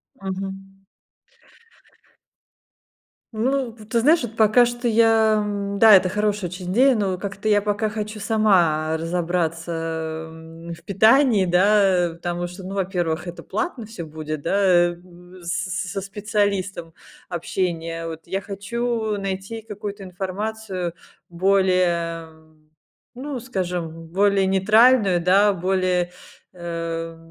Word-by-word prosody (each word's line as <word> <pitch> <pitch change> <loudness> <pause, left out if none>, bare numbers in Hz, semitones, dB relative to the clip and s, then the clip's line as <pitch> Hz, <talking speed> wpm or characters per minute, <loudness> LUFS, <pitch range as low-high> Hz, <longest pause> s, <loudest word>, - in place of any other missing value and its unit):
Мгм. 195 0 -7 2.5
Ну, 255 +3 0
вот 215 -1 -14
ты 235 - +2
знаешь, 310 +6 +4
вот 225 -1 -6
пока 220 +2 +5
что 240 0 -2
я, 225 -1 +4
м, 200 -1 -3
да, 220 -1 +8
это 185 -1 +5
хорошая 210 -1 -1
очень 180 0 -6
идея, 260 +4 +4
но 195 -3 0
как-то 195 +2 -7
я 205 -1 +3
пока 210 +1 0
хочу 215 0 -5
сама 175 -8 +2
разобраться, 165 0 -2 0.6
м, 165 +1 -10
в - - -19
питании, 220 +1 +4
да, 185 0 +3
э. 165 - -9
Потому 175 +1 -4
что, 180 +2 -10
ну, 190 +2 -6
во-первых, 180 -3 -2
это 175 - -8
платно 265 -11 -3
всё 210 -6 -7
будет, 155 -1 -6
да, 190 - 0
э, 175 -1 +4
в 180 0 -16
с 185 +2 -2
с 180 - -6
со 195 - -3
специалистом 200 -3 -2 0.4
общение. 165 -1 -3
Вот 160 0 -8
я 190 +3 -2
хочу 220 +2 -3
найти 195 +3 -5
какую-то 205 -1 -7
информацию 190 0 -4 0.4
более, 175 -3 +1 0.9
ну, 265 +1 -5
скажем, 175 -8 -4
более 195 +2 +2
нейтральную, 205 -1 +4
да, 200 +3 +4
более, 185 -1 0 0.4
э, 165 -2 -5
190 Hz, 125 wpm, -22 LUFS, 175-215 Hz, 2.5 s, да